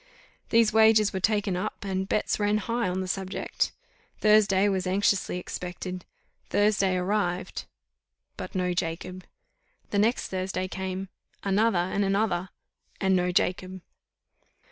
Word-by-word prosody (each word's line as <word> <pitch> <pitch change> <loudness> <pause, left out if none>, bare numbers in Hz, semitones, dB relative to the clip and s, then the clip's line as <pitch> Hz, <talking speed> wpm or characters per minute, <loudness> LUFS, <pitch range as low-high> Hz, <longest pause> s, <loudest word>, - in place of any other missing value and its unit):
These 225 -2 +4
wagers 220 -1 +5
were 190 - -1
taken 205 -1 +1
up, 185 +2 -4
and 190 0 -2
bets 210 - 0
ran 205 0 +2
high 230 0 -1
on 185 +1 -2
the 185 - -4
subject. 190 +1 -2 0.5
Thursday 210 -2 +4
was 190 -2 0
anxiously 195 -1 +1
expected 180 0 -6 0.4
Thursday 200 -2 +2
arrived, 180 -1 -1 0.7
but - - -7
no 180 -1 0
Jacob. 180 +2 -4 0.7
The 200 - +1
next 225 +4 +1
Thursday 185 0 -2
came 190 0 -4 0.3
another, 200 +1 +2
and 185 +3 0
another 195 -2 0 0.5
and 190 -1 +3
no 180 0 +1
Jacob! 185 +1 0
190 Hz, 125 wpm, -27 LUFS, 185-205 Hz, 0.7 s, wagers